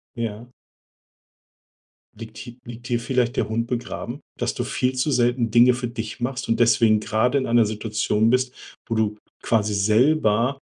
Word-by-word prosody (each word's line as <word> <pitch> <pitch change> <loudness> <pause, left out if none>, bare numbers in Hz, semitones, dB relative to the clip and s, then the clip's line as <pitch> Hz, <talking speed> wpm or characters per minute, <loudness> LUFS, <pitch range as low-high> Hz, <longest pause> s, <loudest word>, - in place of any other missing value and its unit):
Ja. 115 0 -5 1.7
Liegt 110 0 -10
hie 120 -1 -10
liegt 120 +1 -9
hier 120 -2 0
vielleicht 125 -1 0
der - - 0
Hund 115 +1 -1
begraben, 125 +2 -5 0.2
dass - - -1
du - - -2
viel 130 +1 -1
zu 130 +4 0
selten 120 -2 +1
Dinge 120 +2 +6
für 120 0 -3
dich 115 0 -6
machst 125 0 -4
und 115 - +1
deswegen 115 -2 +4
grade 115 +6 +1
in 130 - 0
einer 115 -1 +3
Situation 105 0 0
bist, 130 0 +1 0.3
wo 115 - -2
du 110 -1 0 0.3
quasi 105 -2 +1
selber 115 +4 +2
120 Hz, 160 wpm, -23 LUFS, 110-125 Hz, 1.7 s, Dinge